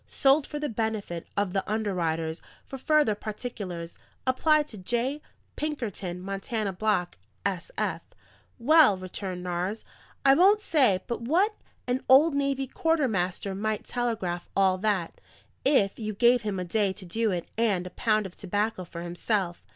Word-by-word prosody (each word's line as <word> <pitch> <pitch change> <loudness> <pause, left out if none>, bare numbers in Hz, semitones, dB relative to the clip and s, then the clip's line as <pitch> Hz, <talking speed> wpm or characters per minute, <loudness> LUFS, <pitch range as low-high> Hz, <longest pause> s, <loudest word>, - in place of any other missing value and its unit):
"'Sold 275 +1 +3
for 295 - -5
the 295 0 -2
benefit 220 - -3
of 200 -2 0
the 195 - 0
underwriters: 170 -7 -1 0.2
for 270 - -8
further 300 -5 +3
particulars, 205 -6 -6 0.3
apply 300 +4 +3
to 290 -7 -11
J. 240 +9 -1 0.3
Pinkerton, 215 - -4
Montana 195 +2 -3
Block, 195 -2 0 0.3
S.F.'" - - -2 0.6
"Well," 275 -4 +6
returned 185 0 -6
Nares, 180 +4 -3 0.4
"I 270 - +8
won't 390 +7 +6
say 260 - +3
but 235 - -4
what 355 - +2 0.3
an 250 +1 0
old 285 +5 +7
navy 275 -1 0
quartermaster 220 - 0
might 215 +2 -2
telegraph 220 -8 -2
all 190 -1 +3
that, 195 -5 -1 0.4
if 250 -9 +3
you 215 -2 -4
gave 240 +3 +4
him 205 -4 -3
a 180 - -3
day 200 +1 +1
to 190 -1 -10
do 220 +6 0
it 175 -3 -2
in 230 - +2
and 185 -4 0
a 180 - -7
pound 215 0 +1
of 185 - -8
tobacco 205 +1 -2
for 170 0 -8
himself. 175 +1 -2
215 Hz, 150 wpm, -27 LUFS, 185-260 Hz, 0.6 s, I